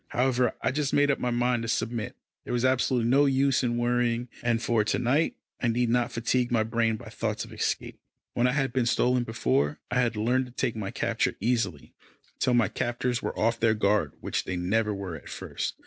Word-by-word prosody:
However, 125 0 +1
I - - +2
just 145 0 -1
made 145 0 +4
up 140 - -1
my 125 - -1
mind 120 0 +1
to 115 - -4
submit. 115 -1 -2 0.3
There - - -5
was 120 +1 +1
absolutely 130 -2 +2
no 140 +4 +4
use 135 -1 +2
in 120 -2 0
worrying, 120 0 0
and 120 -1 +1
for 115 -2 +1
to 105 - 0
night, 130 +7 +1 0.3
I 120 - +1
need 120 +1 +1
not 120 0 +1
fatigue 120 +1 0
my 115 -2 +3
brain 115 0 +1
by - - -10
thoughts - - -3
of - - -13
escape. - - -2 0.3
When 120 +1 +2
I 125 - +1
had 135 -3 0
been 125 -3 +1
stolen 125 0 +2
before, 75 - 0
I 125 - +2
had 120 -2 +1
learned 125 +4 +1
to 125 - -15
take 125 -2 -1
my 105 -3 -4
capture - - -1
easily, 115 - -1 0.5
till 125 -1 +2
my 120 - +4
captors 120 +1 -2
were - - -4
off 115 +1 +1
their 110 -1 +3
guard 105 -1 +1
which - - -2
they 95 - -3
never 105 +5 0
were 100 -4 -5
at - - -11
first. - - -4
120 Hz, 215 wpm, -27 LUFS, 115-125 Hz, 0.5 s, made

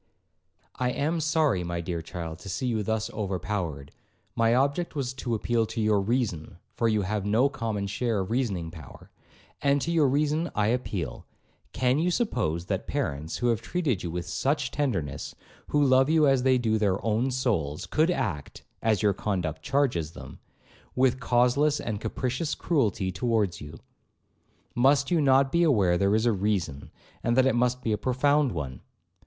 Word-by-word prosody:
'I 125 0 +1
am 160 +4 0
sorry, 150 - +1
my 85 0 -3
dear 85 0 -3
child, 80 0 -7
to 100 - -9
see 130 +8 -3
you 115 -3 0
thus 110 +1 -2
overpowered; 95 -8 -3 0.4
my 115 +1 +3
object 140 +6 0
was 130 -3 -2
to 125 -3 -3
appeal 115 +1 0
to - - -5
your 105 -2 +2
reason, 95 -7 -2 0.2
(for 115 - 0
you 110 -2 +1
have 105 +1 -2
no 110 +7 +3
common 115 -7 -3
share 105 +1 -1
of 95 - -5
reasoning 100 -10 -1
power),—and 85 - -5
to 170 - -1
your 160 -4 +4
reason 150 +4 +1
I 105 0 +2
appeal;—can 125 - -3
you 175 +3 +2
suppose 85 - -1
that - - -3
parents, 75 +3 -3
who 120 - +1
have 115 -4 +1
treated 150 - -1
you 85 - -4
with 85 +1 -4
such 140 -1 -1
tenderness, 120 - -2 0.3
who 145 0 +2
love 130 +1 +4
you 160 -1 +4
as 135 -2 +3
they 130 0 +3
do 110 -3 +1
their 100 -3 +2
own 115 +4 +1
souls, 105 - -1
could 155 +3 +2
act 75 - -3 0.2
(as 110 -2 +1
your 105 -1 +4
conduct 90 -6 -3
charges 120 - 0
them) - - -11 0.6
with 130 0 +2
causeless 125 +5 +2
and 105 -2 -4
capricious 130 +5 -2
cruelty 110 - 0
towards 105 -1 0
you? 75 +2 -9 1.0
Must 135 +3 +3
you 170 -3 +3
not 135 -1 +4
be 170 - +2
aware 105 - +3
there 100 +3 +2
is 110 +2 +1
a 120 - +4
reason, 95 -8 -2 0.3
and 120 +1 +1
that 130 - +5
it 135 - +3
must 125 +1 +1
be 110 - 0
a 105 - 0
profound 140 +3 +2
one? 65 - -5
115 Hz, 170 wpm, -27 LUFS, 95-135 Hz, 1.0 s, that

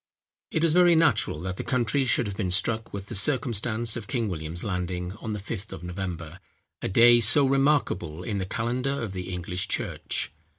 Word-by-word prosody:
It 160 - -1
was 165 -2 +3
very 175 -1 +6
natural, 160 - +2
that 95 +1 -4
the - - -4
country 130 +1 0
should 125 -1 +2
have 100 -2 -5
been 95 -3 -2
struck 110 +4 +1
with 100 -1 -6
the - - -8
circumstance 115 -2 +1
of 115 -4 -6
King 115 -4 -1
William's 80 0 -5
landing 90 -2 -3
on 110 -1 -5
the 105 - -4
Fifth 105 +1 -7
of 80 - -8
November,—a 90 -2 -7
day 120 +4 +6
so 120 +6 +5
remarkable 135 - +1
in 100 +2 -3
the 95 - -3
calendar 125 +6 -2
of 110 -4 -4
the 90 -1 -6
English 90 0 -2
church. - - -3
105 Hz, 185 wpm, -26 LUFS, 90-125 Hz, -, very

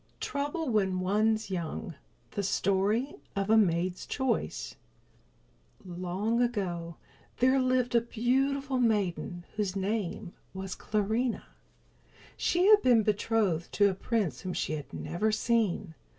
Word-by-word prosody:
TROUBLE 290 +3 -2
WHEN 190 -5 +1
ONE'S 215 +3 +1
YOUNG 175 +1 -4 0.4
The 205 - -2
Story 200 +7 +1 0.2
of 200 +1 0
a - - +7
Maid's 180 -3 +1
Choice 255 - -2 1.1
Long 185 +6 -1
ago 180 -8 -2 0.4
there 260 +2 +4
lived 255 -1 +1
a 235 - +5
beautiful 265 +3 0
maiden 195 -6 0
whose 200 -3 -1
name 195 -2 -2 0.2
was 190 -1 -4
Clarinha. 220 +3 -1 0.9
She 355 +1 +1
had 420 0 +7
been 240 -3 +5
betrothed 205 -5 0
to 205 -1 +4
a - - -3
prince 185 - -1
whom 185 - -4
she - - -2
had 150 -2 -6
never 215 +6 -1
seen. 215 -6 0
210 Hz, 120 wpm, -29 LUFS, 185-240 Hz, 1.1 s, a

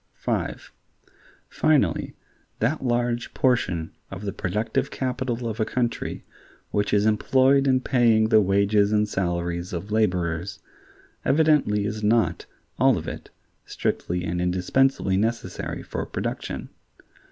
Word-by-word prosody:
(5) - - -3 0.8
Finally, 155 -3 +1 0.4
that 135 +7 0
large 120 -1 -1
portion 95 -11 +1 0.2
of 95 +1 -8
the 100 - -3
productive 110 +8 -1
capital 125 -2 -3
of 110 0 -4
a - - +3
country 120 +1 -2 0.5
which 105 0 0
is 105 0 +3
employed 130 +5 +3
in 130 -1 +4
paying 115 -4 +3
the 110 - +6
wages 100 +1 +3
and 105 0 +2
salaries 85 -2 -2
of 90 +4 -5
laborers, 90 -3 0 0.7
evidently 145 -9 +3
is 105 0 -3
not, 105 -6 +1 0.3
all - - +5
of - - -6
it, - - -7 0.3
strictly 90 0 -2
and 90 0 -2
indispensably 95 +4 +1
necessary 115 +3 -2
for - - -4
production. - - -4
105 Hz, 120 wpm, -24 LUFS, 95-125 Hz, 0.8 s, the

